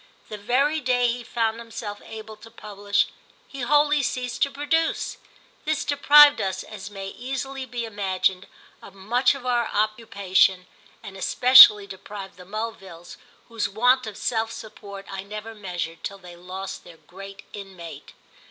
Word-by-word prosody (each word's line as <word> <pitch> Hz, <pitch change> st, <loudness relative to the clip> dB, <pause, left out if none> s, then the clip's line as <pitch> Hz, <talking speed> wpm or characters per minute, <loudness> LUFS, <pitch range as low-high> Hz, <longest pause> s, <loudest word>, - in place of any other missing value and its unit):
The 210 Hz, -, -6 dB
very 270 Hz, +8 st, +1 dB
day 245 Hz, -1 st, +2 dB
he 240 Hz, +1 st, -4 dB
found 225 Hz, -1 st, -2 dB
himself 225 Hz, -3 st, -8 dB
able 220 Hz, 0 st, -10 dB
to 225 Hz, +2 st, -14 dB
publish 205 Hz, -2 st, -1 dB, 0.4 s
he 275 Hz, -, -9 dB
wholly 295 Hz, +3 st, +3 dB
ceased 250 Hz, -1 st, -3 dB
to 280 Hz, -, +3 dB
produce. 305 Hz, +4 st, -1 dB, 0.5 s
This 310 Hz, -1 st, -1 dB
deprived 290 Hz, 0 st, +6 dB
us, 190 Hz, -1 st, -3 dB
as 205 Hz, -2 st, -9 dB
may 195 Hz, -1 st, -7 dB
easily 265 Hz, +3 st, -6 dB
be 240 Hz, -1 st, -4 dB
imagined, 190 Hz, -3 st, -1 dB, 0.3 s
of 195 Hz, -, -14 dB
much 240 Hz, +8 st, +1 dB
of 265 Hz, -2 st, -10 dB
our 240 Hz, -2 st, +1 dB
occupation, 200 Hz, -3 st, +1 dB, 0.4 s
and 195 Hz, -, -10 dB
especially 210 Hz, 0 st, +7 dB
deprived 195 Hz, 0 st, -10 dB
the 180 Hz, -, -13 dB
Mulvilles, 195 Hz, -4 st, -7 dB, 0.3 s
whose 230 Hz, -2 st, -3 dB
want 250 Hz, +4 st, +2 dB
of 210 Hz, -2 st, -8 dB
self 225 Hz, 0 st, -1 dB
support 200 Hz, -3 st, -10 dB
I 195 Hz, 0 st, -6 dB
never 210 Hz, +3 st, -8 dB
measured 175 Hz, -5 st, -6 dB
till 200 Hz, -, -5 dB
they 180 Hz, -2 st, -13 dB
lost 185 Hz, +2 st, -8 dB
their 170 Hz, -2 st, -15 dB
great 195 Hz, +3 st, -12 dB
inmate. 190 Hz, -5 st, -10 dB
215 Hz, 150 wpm, -24 LUFS, 195-245 Hz, 0.5 s, especially